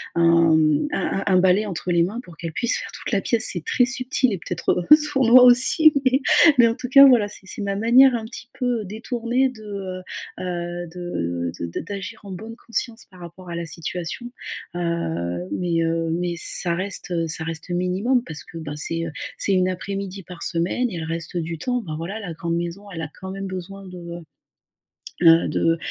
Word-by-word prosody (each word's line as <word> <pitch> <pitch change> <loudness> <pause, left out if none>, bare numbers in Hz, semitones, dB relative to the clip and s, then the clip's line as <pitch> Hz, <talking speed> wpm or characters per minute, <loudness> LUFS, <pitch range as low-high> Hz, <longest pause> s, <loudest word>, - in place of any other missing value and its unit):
un, 170 -1 +4
mmh, 155 - +2
un 195 - -1
un 195 - +3
un - - +6
balai 190 +3 +3
entre 180 -2 -4
les 170 -1 +3
mains 210 +8 -3
pour 170 -6 -15
qu'elle 165 -2 -6
puisse 240 +8 +1
faire - - -7
toute - - -6
la 205 - +2
pièce, 230 +3 +1
c'est 175 -4 -6
très 250 - +2
subtil 255 -1 0
et 195 - -2
peut-être, 175 +1 -2
heu, 300 - +11
sournois 270 -5 +5
aussi 255 +6 +6
mais 260 +2 +3 0.4
mais 240 -2 +7
en 230 - -2
tout 250 0 -6
cas 275 +2 +8
voilà, 245 -6 +5
c'est 205 -1 -9
c'est 190 - -5
ma 200 -1 -2
manière 245 +5 +5
un 230 - -3
petit 230 +2 -9
peu 245 -4 -1
détournée 235 +5 -1
de, 225 -4 -13
heu 195 -3 -6 0.4
heu, 175 -1 -4
de 85 - -3
de 85 0 -4
d'agir 200 +4 -7
en 200 - -9
bonne 220 +5 -8
conscience 230 -1 -4
par 185 - -16
rapport 175 +1 -11
à 170 - -5
la 170 - -4
situation. 170 +8 -5 0.4
Heu, 90 - -3
mais, 170 -2 -1
heu, 165 0 -1
mais 175 +1 -2
ça 170 +1 +4
reste, 190 +2 -1
heu, 165 -1 0
ça 160 0 +5
reste, 165 +1 -4
heu, - - -1
minimum 195 +8 0
parce 155 -1 -6
que 165 - -10
ben 150 -2 -6
c'est, 165 +2 -1
heu, 165 - -5 0.3
c'est 200 - +2
une 185 -1 +2
après-midi 195 +1 -5
par 180 0 -10
semaine 180 +9 -1
et 180 - -5
elle 165 - -4
reste 165 +1 -5
du 165 0 -4
temps, 245 +8 -2
ben 160 -7 -6
voilà, 180 +7 -5
la 190 -6 -6
grande 170 +1 -3
maison, 175 +3 -5
elle 165 -3 -6
a 155 - -5
quand 190 0 -7
même 195 0 -5
besoin 190 +1 -8
de, 180 - -10 1.3
heu - - +6
heu, 165 0 +6
de, 165 0 +1
185 Hz, 215 wpm, -22 LUFS, 170-225 Hz, 1.3 s, heu